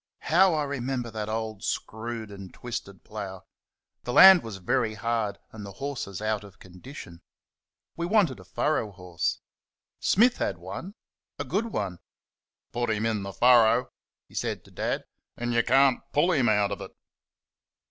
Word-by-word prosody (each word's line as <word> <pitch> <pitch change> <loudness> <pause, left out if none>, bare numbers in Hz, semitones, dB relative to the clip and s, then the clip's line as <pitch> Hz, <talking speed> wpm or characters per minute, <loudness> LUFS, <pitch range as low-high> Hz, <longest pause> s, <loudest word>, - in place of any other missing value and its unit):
How 180 0 +6
I 150 - +1
remember 130 -3 -3
that 110 -1 -4
old, 110 -2 -4
screwed 110 -1 -4
and 95 -2 -9
twisted 100 -5 -7
plough! 95 -3 -7 0.6
The 120 - -3
land 190 +2 +10
was 110 -4 -7
very 110 +4 0
hard, 110 -1 -1
and 110 -1 -9
the 100 -1 -8
horses 120 -6 -5
out 110 -1 -1
of 100 -2 -14
condition. 90 -1 -11 0.7
We 170 0 -2
wanted 185 - +2
a - - -12
furrow 105 - -1
horse. 90 -3 -3 0.6
Smith 240 +5 +4
had - - -1
one 100 - -8 0.4
a - - -3
good 200 - -1
one. 100 - -3 0.7
"Put 120 0 -1
him 110 0 0
in 110 -2 0
the 100 0 -5
furrow," 120 +1 +5 0.4
he - - -22
said - - -3
to - - -17
Dad, - - -2 0.3
"and 120 0 -2
you 120 - +4
can't 135 +1 +4
PULL 170 +5 +3
him 130 -9 +3
out 105 -1 +2
of - - -4
it." - - -9
115 Hz, 160 wpm, -27 LUFS, 100-135 Hz, 0.7 s, land